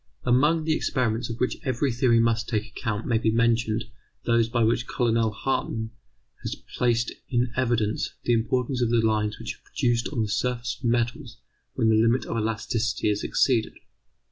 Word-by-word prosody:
Among 150 +6 +3
the 160 0 +1
experiments 120 -5 -1
of 115 +1 -5
which 125 - 0
every 130 0 0
theory 120 0 +3
must 115 0 +1
take 110 -3 0
account 110 -2 -4
may 115 -2 +1
be 110 - +1
mentioned 115 -1 +1 0.4
those 115 -1 +2
by 120 -1 +1
which 115 +2 +1
Colonel 115 -3 +1
Hartmann 110 -1 -2 0.5
has - - -4 0.2
placed 120 -1 +1 0.2
in 120 -1 +1
evidence 120 -4 0
the 120 - +2
importance 125 +3 0
of 120 - +2
the 120 - +2
lines 105 -1 0
which - - -5
are - - -38
produced 120 -1 0
on 120 -6 0
the - - -2
surface 120 +2 -2
of 130 - -8
metals 120 +1 -1 0.4
when 115 -3 +2
the 110 0 +4
limit 115 +3 +2
of - - -4
elasticity 110 0 -1
is 105 - -2
exceeded. 120 -5 +1
115 Hz, 175 wpm, -25 LUFS, 110-125 Hz, 0.5 s, the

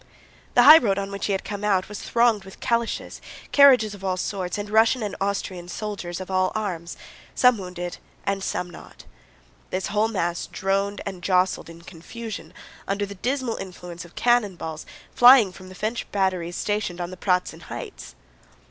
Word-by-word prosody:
The 245 - +7
highroad 245 -9 +8
on 200 0 -3
which 200 - -3
he - - -1
had 195 - -1
come 205 -1 -6
out 195 -3 +2
was 210 -1 -7
thronged 230 -4 +2
with 190 0 -13
calèches, 235 -2 -1 0.3
carriages 255 -7 +6
of 200 -1 -11
all 185 -1 -1
sorts, 185 -1 -3
and 205 0 -4
Russian 225 +3 +3
and 205 -2 -3
Austrian 195 -3 -2
soldiers 185 -2 -5
of 185 0 -7
all 185 0 +2
arms, 180 -6 -4 0.4
some 250 -3 +4
wounded 180 -1 -6 0.3
and 195 -1 -1
some 180 - -2
not. - - -13 0.7
This 185 +1 -2
whole 210 +1 +3
mass 175 -5 -2
droned 195 +1 -1
and 190 -3 -6
jostled 185 -1 +1
in 165 0 -12
confusion 210 +6 -8 0.4
under 200 +1 -1
the 200 - -8
dismal 250 +3 -2
influence 180 -2 -8
of 175 - -16
cannon 240 -6 +2
balls 160 -1 -7 0.3
flying 245 -5 +7
from 185 0 -13
the 185 - -11
French 215 +5 -3
batteries 185 -3 -1
stationed 205 -4 -2
on 175 0 -4
the - - -7
Pratzen 180 -1 -1
Heights. - - -8
195 Hz, 175 wpm, -24 LUFS, 180-215 Hz, 0.7 s, highroad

